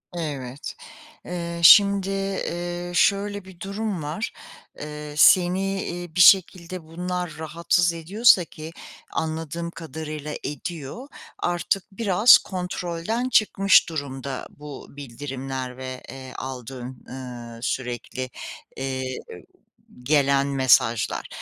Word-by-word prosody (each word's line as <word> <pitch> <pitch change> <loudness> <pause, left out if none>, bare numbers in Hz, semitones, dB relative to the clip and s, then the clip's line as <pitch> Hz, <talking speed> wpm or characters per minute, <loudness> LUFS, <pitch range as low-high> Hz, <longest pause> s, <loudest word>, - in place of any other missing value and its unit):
Evet, 140 -5 -5 0.5
eee, 170 -1 -4
şimdi, 200 +1 +8
eee, 175 -3 -3
şöyle 200 +2 +2
bir 190 -2 -14
durum 200 -3 -3
var. 155 +10 -4 0.5
Eee, 150 0 -7
seni, 190 +3 +4
iii, 175 -2 -6
bir 185 - +4
şekilde 180 -1 +5
bunlar 175 +1 -4
rahatsız 170 +2 +1
ediyorsa 185 +3 +4
ki 160 0 -9 0.4
anladığım 160 +1 -3
kadarıyla 155 -2 -6
ediyor, 155 - -6 0.3
artık 175 +2 0
biraz 210 +2 +6
kontrolden 180 +5 -3
çıkmış 195 -5 +4
durumda 140 -4 -5
bu 145 -2 -10
bildirimler 130 -1 -6
ve, 130 -1 -6
eee, 130 +1 -9
aldığın, 125 -1 -7
ııı, 120 -3 -8
sürekli, 125 0 -3 0.5
eee, 130 -1 -3 1.0
gelen 140 0 +3
mesajlar. 125 -4 +2
160 Hz, 100 wpm, -24 LUFS, 135-180 Hz, 1.0 s, şimdi